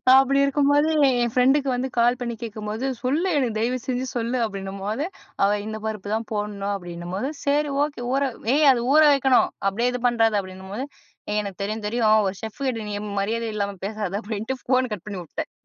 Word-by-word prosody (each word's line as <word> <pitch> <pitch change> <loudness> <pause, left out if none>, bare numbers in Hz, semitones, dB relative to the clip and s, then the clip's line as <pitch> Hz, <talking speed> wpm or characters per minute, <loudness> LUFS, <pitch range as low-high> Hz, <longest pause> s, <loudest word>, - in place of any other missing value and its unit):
தா 255 - +8
அப்டி 275 +1 +2
இருக்கும்போது 285 +2 +3 0.2
என் 240 -3 +1
ஃப்ரெண்டுக்கு 270 +3 +3
வந்து 255 +2 -1
கால் 240 +1 +4
பண்ணி 235 -1 -3
கேட்கும்போது, 215 +2 -4 0.2
"சொல்லு 290 +8 +1
எனக்கு 235 -5 0
தயவு 240 +3 +1
செஞ்சு 255 0 -1
சொல்லு" 240 +2 0
அப்படின்னும்போது, 200 +4 -3 0.4
"அவ 200 - +4 0.2
இந்த 220 0 -4
பருப்பு 215 -2 -4
தான் 225 +1 -2
போட்ணும்" 205 -1 -2
அப்படின்னும்போது, 175 +6 -5 0.2
"சரி 290 0 +2
ஓக்கே! 290 -5 -2
ஊற 275 +1 +2 0.3
ஏய் 300 +1 +4
அது 240 -2 0
ஊற 310 - +8
வைக்கணும். 265 -2 +4 0.2
அப்டியே 230 +5 +1
இது 250 - -3
பண்றாத" 225 -2 +3
அப்படின்னும் 190 0 -10
போது. 260 +5 -3 0.4
"ஏய் 210 0 +1
எனக்கு 200 -1 -7
தெரியும் 215 +1 -4
தெரியும் 215 -2 +3
ஒரு 190 - -5
செஃப் 220 +5 -7
கிட்ட 225 -4 -3
நீ - - -3 0.3
மரியாத 230 +3 -1
இல்லாம 200 -1 -2
பேசாத" 210 -3 -3
அப்டின்ட்டு 225 +4 -4
ஃபோன் 255 -1 +2
கட் 200 - -5
பண்ணி 195 -3 -5
உட்டேன். - - -6
230 Hz, 190 wpm, -24 LUFS, 205-255 Hz, 0.4 s, தா